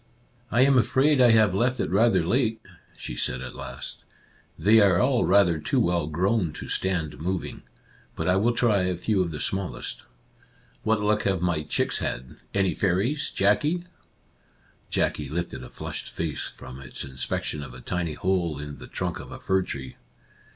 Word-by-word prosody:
I 120 - +3
am 135 -1 +6
afraid 135 +3 +3
I 125 - +7
have 110 -4 +5
left 120 +5 +1
it 85 - -1
rather 115 +5 +4
late," 115 -3 +1 0.4
she - - -6
said 65 +1 -1
at 65 - -7
last. - - -7 0.3
" - - -33
They 105 +7 +5
are 95 -4 +5
all 125 -1 +3
rather 90 -4 +4
too - - 0
well 85 -3 +1
grown 90 +2 +1
to - - -7
stand 85 -8 -1
moving. 90 +2 -3 0.5
But - - -3
I 90 - +4
will 120 +4 +2
try 110 -5 +3
a 90 -1 -1
few 100 +2 +1
of 90 - 0
the 75 -2 -6
smallest. 95 +3 -3 0.8
What 110 -1 +1
luck 105 +1 +2
have 95 -3 +1
my 85 -3 +1
chicks 75 - 0
had? 60 +1 -4
Any 95 -3 +1
fairies, 100 - 0
Jackie? 145 - +2 0.5
" - - -36 0.2
Jackie 75 -3 0
lifted 85 +3 -4
a - - -9
flushed - - -6
face 80 -3 -3
from 65 +1 -10
its - - -5
inspec 65 -1 -3
tion 75 - -3
of 60 -3 -9
a - - -9
tiny 85 +4 -2
hole 90 -5 0
in 75 0 -7
the - - -10
trunk - - -3
of - - -10
a - - -8
fir 95 0 +1
tree. 70 -7 -6
95 Hz, 185 wpm, -26 LUFS, 80-110 Hz, 0.8 s, I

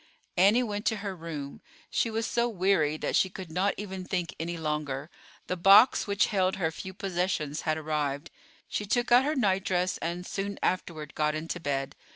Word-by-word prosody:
Annie 205 +7 +5
went 205 -2 -3
to 220 - +2
her 195 -1 -3
room. 155 -5 -7 0.3
She 230 - +1
was 225 0 -1
so 240 0 +1
weary 185 -7 +2
that - - -2
she 190 - +3
could 185 -3 -8
not 190 +4 +1
even 190 -2 -5
think 180 -2 -2
any 170 +1 -3
longer. 150 -2 -3 0.3
The 180 - -2
box 195 +8 +6
which 200 0 +3
held 190 -1 +2
her 165 -4 0
few 190 +3 -7
possessions 175 -6 -1
had 155 - +2
arrived. 150 -1 -2 0.4
She 210 - -3
took 240 +3 0
out 250 +2 +7
her 300 +2 0
nightdress 190 -5 +1
and, 175 +2 -3
soon 200 +1 -3
afterward, 160 -4 -2
got 150 0 0
into 165 +3 -4
bed. 135 -4 -2
180 Hz, 185 wpm, -28 LUFS, 155-200 Hz, 0.4 s, out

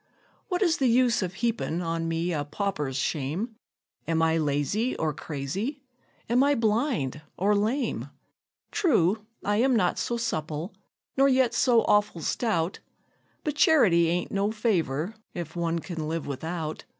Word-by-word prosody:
What 365 +1 0
is 340 -3 +2
the 265 - +2
use 240 -1 +3
of 185 -1 -3
heapin' 225 -7 0
on 165 0 -2
me 165 +2 -1
a 150 -2 -1
pauper's 145 -5 -2
shame? 160 - -2 0.5
Am 165 0 +1
I 160 0 +3
lazy 155 - 0
or 155 -1 0
crazy? 185 - -4 0.4
am 245 +3 +4
I 285 +1 +3
blind 220 - 0 0.2
or 205 +3 +3
lame? 230 +6 -1 0.6
True, 220 - +2 0.2
I 205 0 +2
am 255 +3 +3
not 180 -5 +2
so 240 - -1
supple, 160 -5 -3 0.4
nor 275 +1 +5
yet 260 -2 +3
so 235 -2 +4
awful 205 -5 +2
stout; 190 -5 -1 0.6
But 300 - -1
charity 200 - +5
ain't 175 +1 -1
no 200 +1 +1
favor, 185 - 0 0.2
if 170 -1 -5
one 170 -1 0
can 165 -2 -5
live 165 0 -2
without. 160 +3 -4
195 Hz, 150 wpm, -27 LUFS, 160-235 Hz, 0.6 s, nor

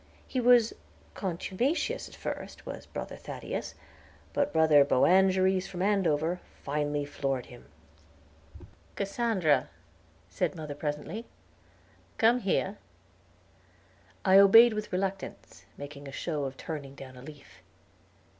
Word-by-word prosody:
He 260 - -2
was 240 -2 +5 0.4
contumacious 195 - -2
at - - -14
first, - - -6
was - - -8
Brother - - -6
Thaddeus, - - -6 0.6
but 285 - +1
Brother 160 -3 +6
Boanerges 185 +6 +3
from 185 -1 -4
Andover 175 -4 +1 0.2
finally 145 0 -1
floored 135 -3 -2
him. 120 -1 -14 1.3
"Cassandra," 200 -6 +1 0.6
said 90 - -2
mother, 155 -3 -6
presently, 150 +9 -4 0.9
"come 235 +2 +4
here." 200 -1 -1 1.5
I 190 0 +7
obeyed 225 +4 +8
with 215 0 -4
reluctance, 190 +1 -4
making 145 0 -9
a - - -7
show 150 0 -3
of 135 0 -6
turning 140 -3 -6
down 130 -2 -11
a 125 - -11
leaf. 135 -10 -13
175 Hz, 110 wpm, -29 LUFS, 145-195 Hz, 1.5 s, obeyed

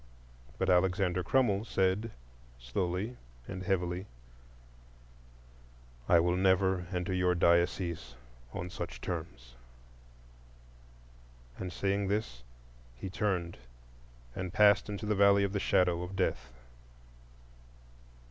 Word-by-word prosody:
But 95 - 0
Alexander 90 0 +2
Crummell 105 -2 +2
said, 95 0 0 0.5
slowly 90 - -3 0.3
and 95 - -6
heavily: 90 0 -1 2.0
"I 85 - +7
will 90 +1 +2
never 95 -1 +2
enter 90 0 -2
your 90 -1 +2
diocese 85 -3 +1 0.4
on 90 +1 -5
such - - -6
terms." 80 -9 -6 2.1
And 90 -1 -4
saying 100 +1 -1
this, 100 - -2 0.5
he 90 +10 -7
turned 90 -6 -2 0.8
and 90 -1 -4
passed 105 +1 +4
into 105 +1 -4
the 105 - +1
Valley 100 0 +5
of 100 0 -1
the 100 - 0
Shadow 90 -2 +2
of 90 +2 -6
Death. 90 -9 -1
95 Hz, 100 wpm, -31 LUFS, 90-100 Hz, 2.1 s, I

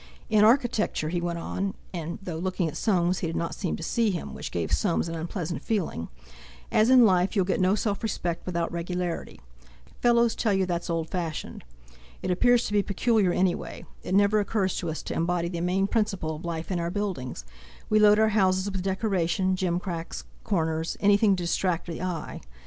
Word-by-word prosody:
"In 210 -1 +5
architecture," 225 - +2
he 175 +1 -1
went 170 -1 -2
on—and 175 -2 -5
though 170 -4 -4
looking 185 -1 -1
at 155 - -5
Soames 180 -4 +1
he 170 - -2
did 165 - -4
not 170 - -2
seem 185 -6 -2
to - - -7
see 230 +6 +1
him, 180 -4 -4
which - - -6
gave 85 -2 -3
Soames 170 -4 +1
an 165 - -4
unpleasant 170 +1 -4
feeling—"as 70 - -2
in 255 -2 +8
life, 185 0 +3
you'll 190 -3 +3
get 185 0 0
no 185 +2 +4
self 205 -1 -1
respect 175 -6 -2
without 170 -2 -1
regularity. 175 0 -4 0.6
Fellows 235 -1 +4
tell 215 -3 +1
you 190 0 +2
that's 175 -1 -3
old 165 -1 -2
fashioned. 170 -4 -4 0.6
It 185 - 0
appears 245 +6 +3
to 205 - -4
be 205 - +4
peculiar 205 -1 +2
any 180 0 +2
way; - - -8 0.2
it 185 - -2
never 205 +1 +4
occurs 200 -2 0
to 170 - -3
us 160 - -4
to - - -4
embody 170 0 0
the 170 -1 -4
main 185 +2 +1
principle 195 -7 -1
of 155 - -9
life 165 +1 -4
in 180 - 0
our 170 0 -1
buildings; 175 - -4 0.4
we 215 - +3
load 210 0 +6
our 220 0 +4
houses 190 -2 +2
with 190 -1 -3
decoration, 190 -1 0
gimcracks, 175 -2 -3 0.2
corners, 160 -5 -1
anything 205 0 +4
to 180 - -4
distract 175 0 0
the 170 -1 -6
eye. 180 -4 -4
180 Hz, 190 wpm, -27 LUFS, 170-205 Hz, 0.6 s, in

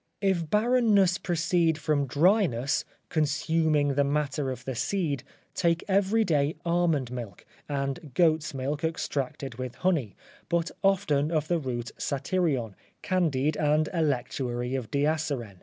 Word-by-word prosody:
If 190 -5 0
barrenness 210 -4 +3
proceed 170 -1 +1
from 145 -2 0
dryness, 145 - +2 0.2
consuming 155 -1 +1
the 140 +1 +2
matter 145 -1 -1
of 130 0 -6
the 130 - -3
seed; 145 - -1 0.3
take 170 -1 +1
every 200 +3 +3
day 150 -1 +1
almond 170 -7 +1
milk, 115 -7 -7 0.2
and 140 +1 -3
goat's 160 -3 +3
milk 140 +3 -3
extracted 135 -5 -3
with 130 -1 -5
honey, 155 - 0 0.3
but 170 -1 0
often 155 -7 +2
of 155 -2 0
the 175 -1 +2
root 120 -4 -4
satyrion, 140 - -1 0.3
candied, 155 -6 +1
and 155 +1 +2
electuary 125 -5 -1
of 130 -5 -3
diasyren. 140 -8 -1
150 Hz, 125 wpm, -27 LUFS, 135-170 Hz, 0.3 s, barrenness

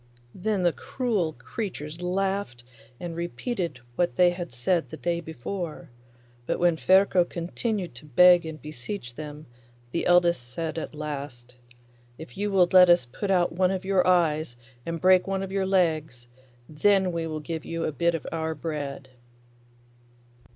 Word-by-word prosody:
Then 195 0 -1
the 175 -2 +3
cruel 215 -11 -2
creatures 155 - -6
laughed, 190 -8 -2 0.4
and 170 -2 -5
repeated 175 - -3 0.2
what 175 -8 +1
they 180 +3 +5
had 175 -3 -6
said 130 +4 0
the - - -8
day 170 0 -1
before; 165 0 -6 0.6
but - - 0
when 175 -1 +3
Ferko 185 +2 +4
continued 180 - -3
to 120 +5 -11
beg 180 +5 +6
and 160 -1 -7
beseech 140 - -7
them, 150 +2 -8 0.5
the 170 - -1
eldest 175 -4 +4
said 160 +3 -3
at 155 - -7
last, 140 -5 -6 0.6
'If 160 - -11
you 205 +1 -1
will 190 -3 +4
let 180 -1 +8
us 175 -6 +5
put 160 - -5
out 180 -3 +2
one 180 +1 +2
of 190 0 -3
your 190 -2 +2
eyes 155 -7 +2 0.3
and 165 0 -3
break 185 +2 +5
one 195 0 -1
of 190 - -6
your 195 -1 0
legs, 155 -9 0 0.4
then 190 +4 +2
we 165 -1 -2
will 155 -1 -4
give 160 +1 -5
you 165 0 -4
a - - -1
bit 170 +4 +1
of 165 - -5
our 160 -1 -2
bread. 145 -3 -5
170 Hz, 160 wpm, -26 LUFS, 155-185 Hz, 0.6 s, let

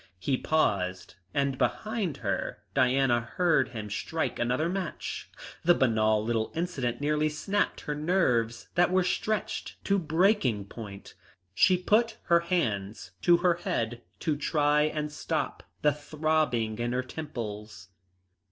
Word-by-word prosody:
He 100 +9 0
paused, 95 -12 0 0.2
and 140 0 0
behind 175 - -1
her, 100 +1 -2
Diana 130 -2 +3
heard 135 +3 +2
him 110 -4 -6
strike 160 +9 -2
another 125 +7 +1
match. 185 -1 -4 0.3
The 175 +1 +5
banal 110 -3 +2
little 115 -1 0
incident 145 -8 -2
nearly 150 +1 +1
snapped 195 +7 -1
her 150 - -3
nerves 135 -8 +1
that 175 +1 +4
were 185 0 +3
stretched 215 +4 -2
to 200 0 +3
breaking 160 - +2
point. 100 -2 -9 0.4
She 180 - +5
put 215 +5 +2
her 170 -1 +4
hands 110 - -2
to 175 -1 +6
her 175 -1 +4
head 120 -8 -2 0.2
to 155 -3 +1
try 150 0 +2
and 150 -1 -2
stop 150 - -2 0.2
the 150 -1 +5
throbbing 150 -7 0
in 120 +1 -1
her 130 +1 0
temples. 105 - -7
145 Hz, 135 wpm, -28 LUFS, 115-170 Hz, 0.4 s, to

